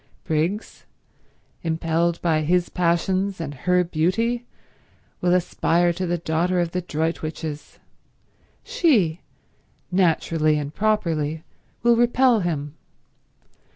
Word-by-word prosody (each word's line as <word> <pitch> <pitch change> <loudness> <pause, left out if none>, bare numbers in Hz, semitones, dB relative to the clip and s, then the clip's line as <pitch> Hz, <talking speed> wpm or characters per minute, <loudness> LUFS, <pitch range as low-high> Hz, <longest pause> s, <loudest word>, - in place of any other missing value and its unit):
Briggs, 170 +6 -2 0.7
impelled 165 +1 0
by 160 -3 +2
his 175 +3 +1
passions 185 +3 0
and 150 -3 -4
her 180 +6 +1
beauty, 225 +9 0 0.7
will 180 0 +3
aspire 175 -1 +1
to 185 +1 -3
the 175 0 0
daughter 170 +2 0
of 170 -1 0
the 180 - -2
Droitwiches. 155 -2 -4 0.9
She, 245 - +2 0.7
naturally 165 -4 +2
and 145 0 -4
properly, 160 -8 0 0.4
will 235 0 +5
repel 240 0 +4
him. 150 -6 -3
170 Hz, 100 wpm, -23 LUFS, 160-185 Hz, 0.9 s, will